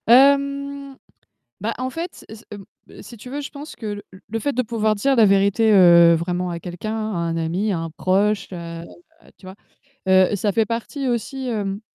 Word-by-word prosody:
Hem, 280 +2 +3 0.6
bah, 225 +4 -2
en 255 +1 -3
fait, 335 +6 -7
s 220 +1 -12
m 205 - -8 0.3
b - - -13
si 240 - -12
tu 240 +3 -11
veux, 285 +2 -4
je 285 - -7
pense 290 +2 -10
que 220 - -8
le 205 -1 -5
l 190 - -14
le 225 +2 -3
fait 285 +6 -1
de 255 - 0
pouvoir 220 -2 0
dire 270 +6 +1
la 230 - +6
vérité, 200 +3 +3
heu, 170 -3 +7
vraiment 180 +2 -2
à 170 -1 -5
quelqu'un, 180 +6 -5 0.2
à - - -3
un 165 -1 -2
ami, 175 +6 -1
à 175 - -1
un 165 0 -5
proche, 200 +5 0
heu, 170 -1 -7 0.6
tu 185 - -15
vois? 185 - -9 0.5
Heu, 190 +1 +4
ça 205 +1 0
fait 225 +3 +2
partie 235 +5 -4
aussi, 255 +2 -3
hem, 205 -3 -3
210 Hz, 205 wpm, -21 LUFS, 185-255 Hz, 0.6 s, heu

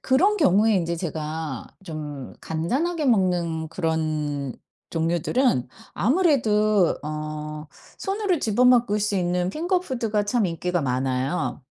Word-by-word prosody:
그런 380 +11 +3
경우에 215 - +4
인제 170 -1 -1
제가 155 -4 -4 0.2
좀 150 -5 -6
간단하게 285 - -1
먹는 175 - +1
그런 155 -5 -2 0.3
종류들은 165 - +1 0.2
아무래도 215 - +3
어 150 0 -5 0.3
손으로 390 -3 0
집어 225 0 +2
먹을 240 -4 +4
수 210 0 0
있는 180 0 0
핑거푸드가 260 - -1
참 215 -1 +1
인기가 175 +1 -1
많아요. 130 +3 -1
180 Hz, 250 characters per minute, -24 LUFS, 155-240 Hz, 0.3 s, 경우에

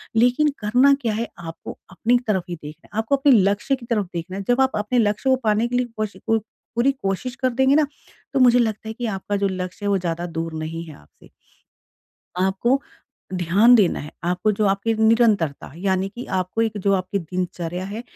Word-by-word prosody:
लेकिन 250 +6 +4
करना 245 +7 +4
क्या 230 -4 0
है 230 +2 -2
आपको 165 -1 -8
अपनी 230 +7 +2
तरफ 190 -4 +1
ही 175 - -3
देखना 155 0 -11
है, 210 - -6
आपको 225 +5 +2
अपने 275 +1 +4
लक्ष्य 205 +4 +3
की 250 -3 -12
तरफ 220 -4 0
देखना 175 +2 -5
है। 200 - -4
जब 245 +2 +4
आप 265 - +3
अपने 215 +4 0
लक्ष्य 210 +4 +1
को 260 - +5
पाने 215 +1 +2
के 245 - -3
लिए 250 - +1
कोशिकु 215 +1 -1 0.4
पूरी 240 +4 +3
कोशिश 195 +7 -2
कर 255 -1 0
देंगे 265 +3 +3
ना, 305 -1 +4 0.5
तो - - +2
मुझे 245 -1 +6
लगता 220 -1 -1
है 220 - -4
कि 245 +2 -5
आपका 195 +2 -3
जो 200 0 +1
लक्ष्य 185 +1 -5
है - - +1
वो 200 - +3
ज़्यादा 170 -1 -3
दूर 165 -1 -4
नहीं 165 +1 -5
है 155 - -10
आपसे। - - -21 1.1
आपको 215 +8 +1 0.5
ध्यान 190 +8 +5
देना 205 -7 +3
है। 150 - -8
आपको 180 +4 +1
जो 210 +1 0
आपके 200 +3 +1
निरंतरता 220 - +2
यानी 190 +1 0
कि 245 - -6 0.2
आपको 185 +5 -1
एक 220 -2 -1
जो 200 0 +1
आपकी 185 +1 -1
दिनचर्या 180 0 -4
है 215 +4 -6
210 Hz, 205 wpm, -22 LUFS, 185-240 Hz, 1.1 s, मुझे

